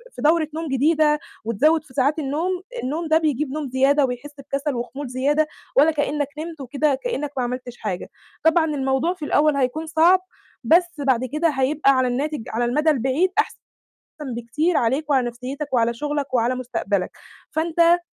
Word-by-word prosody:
في -, -, -7 dB
دورة 315 Hz, +1 st, +3 dB
نوم 325 Hz, 0 st, -3 dB
جديدة 300 Hz, +2 st, +3 dB, 0.3 s
وتزوّد 300 Hz, +9 st, +2 dB
في 260 Hz, -, -18 dB
ساعات 285 Hz, +4 st, +1 dB
النوم، 325 Hz, +6 st, -1 dB, 0.2 s
النوم 315 Hz, +6 st, -2 dB
ده 315 Hz, 0 st, +4 dB
بيجيب 300 Hz, -3 st, -1 dB
نوم 295 Hz, -1 st, -4 dB
زيادة 270 Hz, +3 st, +3 dB
وبيحس 250 Hz, +3 st, -5 dB
بكسل 275 Hz, +1 st, -3 dB
وخمول 260 Hz, +4 st, -5 dB
زيادة 285 Hz, +5 st, +1 dB, 0.3 s
ولا 300 Hz, +4 st, +6 dB
كإنّك 290 Hz, -1 st, -1 dB
نمت 320 Hz, -1 st, -6 dB
وكده 280 Hz, +2 st, 0 dB
كإنّك 295 Hz, -, -2 dB
ما 255 Hz, -, +1 dB
عملتش 245 Hz, 0 st, -5 dB
حاجة، 190 Hz, -4 st, -4 dB, 0.3 s
طبعًا 325 Hz, 0 st, +4 dB
الموضوع 280 Hz, +2 st, 0 dB
في 310 Hz, -, -6 dB
الأول 295 Hz, 0 st, +3 dB
هيكون 275 Hz, +5 st, -1 dB
صعب 330 Hz, +4 st, +4 dB, 0.4 s
بس 345 Hz, +8 st, +4 dB
بعد 260 Hz, -3 st, +2 dB
كده 305 Hz, +6 st, 0 dB
هيبقى 275 Hz, +1 st, +2 dB
على 260 Hz, -1 st, +2 dB
الناتج 280 Hz, +2 st, -2 dB
على 240 Hz, +2 st, 0 dB
المدى 300 Hz, +6 st, +2 dB
البعيد 275 Hz, +6 st, +2 dB
أحسن 435 Hz, -, 0 dB, 0.8 s
بكتير 300 Hz, +9 st, 0 dB
عليك 265 Hz, +6 st, 0 dB
وعلى 260 Hz, -3 st, +3 dB
نَفْسيّتك 260 Hz, +5 st, -6 dB
وعلى 235 Hz, -1 st, +2 dB
شُغلك 290 Hz, +2 st, -3 dB
وعلى 240 Hz, +1 st, +2 dB
مستقبلك، 205 Hz, -6 st, -2 dB, 0.4 s
فأنت 335 Hz, +2 st, +3 dB
290 Hz, 165 wpm, -22 LUFS, 255-315 Hz, 0.8 s, ولا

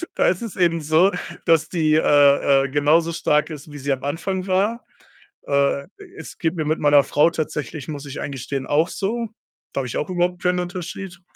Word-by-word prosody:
da -, -, +2 dB
ist 180 Hz, +3 st, +1 dB
es 225 Hz, -3 st, -6 dB
eben 170 Hz, -3 st, +2 dB
so, 160 Hz, +5 st, +3 dB, 0.3 s
dass 165 Hz, -2 st, +3 dB
die, 155 Hz, -3 st, +2 dB
äh-äh, 140 Hz, -2 st, +4 dB
genauso 150 Hz, +4 st, +2 dB
stark 150 Hz, -2 st, +1 dB
ist, 150 Hz, -1 st, -9 dB
wie 145 Hz, -, -9 dB
sie 140 Hz, +1 st, -2 dB
am 130 Hz, -1 st, -2 dB
Anfang 185 Hz, +6 st, -3 dB
war. 205 Hz, +6 st, 0 dB, 0.6 s
Äh, 140 Hz, 0 st, +1 dB, 0.3 s
es -, -, -10 dB
geht 165 Hz, 0 st, -1 dB
mir 155 Hz, -, -1 dB
mit 155 Hz, +2 st, -1 dB
meiner 145 Hz, -1 st, +5 dB
Frau 150 Hz, +3 st, +3 dB
tatsächlich, 150 Hz, -3 st, -4 dB
muss 145 Hz, -1 st, -6 dB
ich 140 Hz, -, -6 dB
eingestehen, 135 Hz, 0 st, -4 dB
auch 155 Hz, +4 st, +2 dB
so. 230 Hz, +4 st, -3 dB, 0.4 s
Da -, -, -3 dB
habe 130 Hz, -, -3 dB
ich 120 Hz, -, -5 dB
auch 150 Hz, -, -2 dB
überhaupt 180 Hz, 0 st, -1 dB
keinen 180 Hz, 0 st, +1 dB
Unterschied 180 Hz, 0 st, -6 dB
155 Hz, 190 wpm, -22 LUFS, 145-180 Hz, 0.6 s, meiner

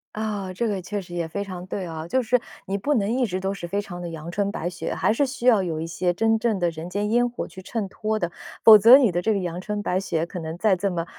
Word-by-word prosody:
啊， 205 Hz, -3 st, -3 dB
这 235 Hz, +6 st, -1 dB
个 200 Hz, -2 st, -2 dB
确 205 Hz, +3 st, -4 dB
实 175 Hz, -2 st, -12 dB
也 170 Hz, -1 st, -2 dB
非 200 Hz, +5 st, -4 dB
常 185 Hz, -2 st, -7 dB
对 190 Hz, 0 st, -4 dB
啊。 160 Hz, -1 st, -6 dB
就 260 Hz, +9 st, +1 dB
是 245 Hz, +1 st, +2 dB, 0.3 s
你 195 Hz, +1 st, -1 dB
不 285 Hz, +9 st, 0 dB
能 210 Hz, -5 st, +1 dB
一 250 Hz, +1 st, +1 dB
直 185 Hz, -4 st, -3 dB
都 195 Hz, +1 st, -1 dB
是 175 Hz, -3 st, -6 dB
非 200 Hz, +4 st, -1 dB
常 175 Hz, -3 st, -8 dB
得 175 Hz, -, -5 dB
阳 165 Hz, 0 st, -7 dB
春 200 Hz, +2 st, 0 dB
白 175 Hz, -4 st, -3 dB
雪， 180 Hz, 0 st, -4 dB
还 -, -, +2 dB
是 255 Hz, +6 st, +2 dB
需 260 Hz, -2 st, -6 dB
要 230 Hz, -5 st, +6 dB
有 165 Hz, -4 st, -3 dB
一 -, -, -3 dB
些 175 Hz, +2 st, -1 dB
真 225 Hz, +4 st, +2 dB
正 220 Hz, -2 st, +1 dB
的 175 Hz, -2 st, +1 dB
人 165 Hz, +1 st, -7 dB
间 205 Hz, +3 st, -2 dB
烟 245 Hz, +1 st, +3 dB
火 240 Hz, -, -5 dB
去 190 Hz, -, -11 dB
衬 205 Hz, +1 st, -4 dB
托 215 Hz, +2 st, -2 dB
的， 175 Hz, -4 st, -2 dB, 0.3 s
否 220 Hz, -1 st, +11 dB
则 230 Hz, +6 st, +9 dB
你 250 Hz, -8 st, +3 dB
的 175 Hz, 0 st, -1 dB
这 220 Hz, +4 st, +1 dB
个 200 Hz, -, 0 dB
阳 175 Hz, -1 st, -4 dB
春 205 Hz, +2 st, -4 dB
白 185 Hz, -1 st, 0 dB
雪 165 Hz, -4 st, -1 dB
可 180 Hz, +1 st, -7 dB
能 160 Hz, 0 st, -6 dB
在 210 Hz, +2 st, +3 dB
这 200 Hz, +3 st, 0 dB
么， 170 Hz, -2 st, -2 dB
195 Hz, 315 characters per minute, -24 LUFS, 175-220 Hz, 0.3 s, 否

